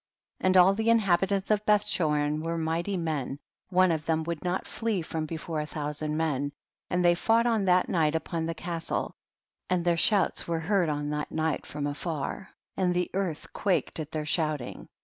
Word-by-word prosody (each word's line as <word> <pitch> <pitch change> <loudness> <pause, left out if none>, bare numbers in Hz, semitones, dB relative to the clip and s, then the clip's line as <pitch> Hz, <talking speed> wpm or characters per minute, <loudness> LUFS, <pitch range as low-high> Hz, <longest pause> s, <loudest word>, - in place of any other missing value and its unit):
3. - - 0
And 185 0 +5
all 185 +2 +7
the 220 +3 0
inhabitants 195 -2 +2
of 210 0 +2
Beth 210 -1 +3
chorin 150 -5 +1
were 165 +1 -2
mighty 165 +4 -1
men, 150 -5 -2 0.3
one 185 -1 +4
of 160 -2 -1
them 160 -1 +1
would 170 -1 -4
not 180 +1 -1
flee 220 -6 -2
from 160 -1 -3
before 160 0 -3
a 150 - -5
thou 150 -1 -3
sand 150 +1 -3
men, 145 -3 0 0.4
and 180 0 +1
they 175 - +6
fought 225 +6 +2
on 225 -4 +2
that 180 -1 +4
night 160 -3 +2
upon 160 +1 -2
the 165 - -3
castle, 170 -1 -3 0.6
and 180 -1 +1
their 170 -1 +3
shouts 200 +4 +2
were 170 -1 0
heard 180 -1 +2
on 145 0 -2
that 150 0 -2
night 160 -1 -1
from 145 -1 -4
afar, 150 +4 -4 0.3
and 180 -2 +1
the 180 0 0
earth 185 -5 -3
quaked 190 -4 0
at 155 -2 -4
their 155 -1 -3
shouting. 150 -4 -2
165 Hz, 195 wpm, -28 LUFS, 155-185 Hz, 0.6 s, all